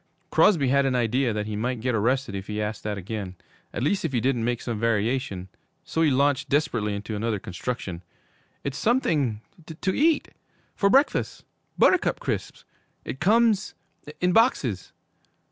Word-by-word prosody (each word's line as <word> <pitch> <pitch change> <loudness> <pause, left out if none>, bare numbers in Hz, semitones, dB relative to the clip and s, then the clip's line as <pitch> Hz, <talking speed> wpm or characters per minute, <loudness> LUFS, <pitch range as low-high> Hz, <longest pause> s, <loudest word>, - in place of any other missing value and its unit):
Crosby 155 -11 +4
had 140 +1 +3
an 130 - 0
idea 125 +1 +1
that 105 -1 -2
he 105 0 -4
might 120 +3 -2
get 125 +2 -1
arrested 120 +2 0
if 95 0 -5
he 105 0 -3
asked 105 0 -3
that 105 -1 -3
again, 100 -1 -5 0.4
at - - -3
least 190 +8 +1
if 160 -5 -2
he 120 - +2
didn't 125 -1 0
make 120 0 0
some 115 -3 -4
variation, 110 -3 -1 0.4
so 160 - -2
he 160 - +4
launched 140 +1 +1
desperately 125 -8 0
into 105 +2 -5
another 110 +1 -1
construction. 95 -1 -5 0.6
'It's 140 -1 -4
something 150 - +1 0.4
to 190 - 0
eat! 310 +1 +2 0.5
For 200 - +2
breakfast! 275 +7 +2 0.3
Buttercup 370 - +3
Crisps! - - -4 0.4
It 135 - -6
comes 215 +3 +3 0.4
in 180 0 +2
boxes.' 145 - +2
125 Hz, 160 wpm, -25 LUFS, 105-150 Hz, 0.6 s, Crosby